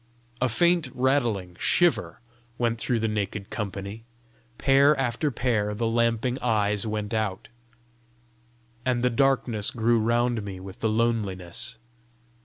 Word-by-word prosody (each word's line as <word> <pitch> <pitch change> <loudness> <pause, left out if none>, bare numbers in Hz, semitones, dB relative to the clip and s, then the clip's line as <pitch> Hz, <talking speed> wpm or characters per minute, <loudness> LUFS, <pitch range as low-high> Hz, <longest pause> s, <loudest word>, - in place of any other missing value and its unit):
A 130 - +2
faint 170 +4 +2
rattling 120 -9 0
shiver 175 -7 +2 0.4
went 115 -1 0
through 120 +1 0
the 110 - 0
naked 105 -1 -3
company; 100 +1 -5 0.5
pair 140 +2 +4
after 135 +3 0
pair 115 -5 0
the 115 +2 -1
lamping 115 +2 +1
eyes 105 -3 +1
went 105 0 -3
out; 110 -1 -2 1.3
and 125 -1 0
the 125 - +3
darkness 120 -4 +1
grew 115 0 +2
round 120 +1 +1
me 100 -2 -7
with 95 +1 -10
the 110 - 0
loneliness. 110 -4 -1
115 Hz, 125 wpm, -26 LUFS, 105-125 Hz, 1.3 s, pair